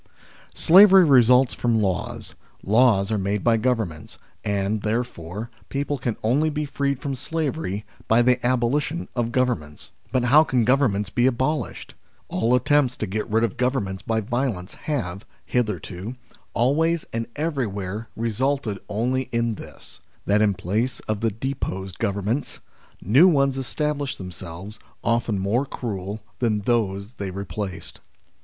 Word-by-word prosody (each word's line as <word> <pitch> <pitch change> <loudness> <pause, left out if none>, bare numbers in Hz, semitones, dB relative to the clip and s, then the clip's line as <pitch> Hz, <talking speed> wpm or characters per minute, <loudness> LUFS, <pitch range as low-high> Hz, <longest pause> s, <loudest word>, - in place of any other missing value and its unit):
SLAVERY 190 +1 +8
results 125 -2 +5
from 115 -2 +1
laws, 95 -4 -2 0.3
laws 110 -2 +4
are 110 - +1
made 100 +1 -1
by 115 -1 +4
Governments, 110 - -2 0.3
and, 100 +1 -1
therefore, 110 -2 -3 0.2
people 140 0 -2
can 120 -3 -2
only 140 +8 +2
be 150 0 -2
freed 140 -1 -1
from 140 -1 -3
slavery 135 - -3 0.2
by 115 +2 +4
the 125 0 +2
abolition 130 +6 0
of 120 -1 -1
Govern 125 -2 +2
ments. 75 -1 -11 0.2
But 130 - +1
how 145 +6 +6
can 125 -7 +1
Governments 110 -7 +2
be 120 +5 +3
abolished? 130 +5 -2 0.4
All 115 +3 +2
attempts 130 0 +2
to - - -2
get 105 +2 -3
rid 110 +2 +2
of 115 -2 -1
Governments 120 -7 -1
by 110 -1 -1
violence 115 -5 -2
have, 105 - -4 0.2
hitherto, 105 - -2 0.4
always 160 +7 +2
and 115 0 -2
everywhere 110 - -3
resulted 115 -1 -1
only 125 +4 -1
in 115 -1 0
this: - - -11 0.3
that 105 +1 +3
in 105 -2 +3
place 115 +8 -1
of 110 -1 -3
the 115 - +2
deposed 95 -5 -4
Governments, 105 +5 -2 0.4
new 130 - +6
ones 140 -5 +3
established 145 +1 -2
themselves, 90 +3 -8 0.2
often 115 -2 +1
more 100 +7 +1
cruel 105 -4 -5 0.2
than 110 -4 +1
those 100 -2 -1
they 100 -1 -4
replaced. 100 0 -6
115 Hz, 140 wpm, -24 LUFS, 100-130 Hz, 0.4 s, SLAVERY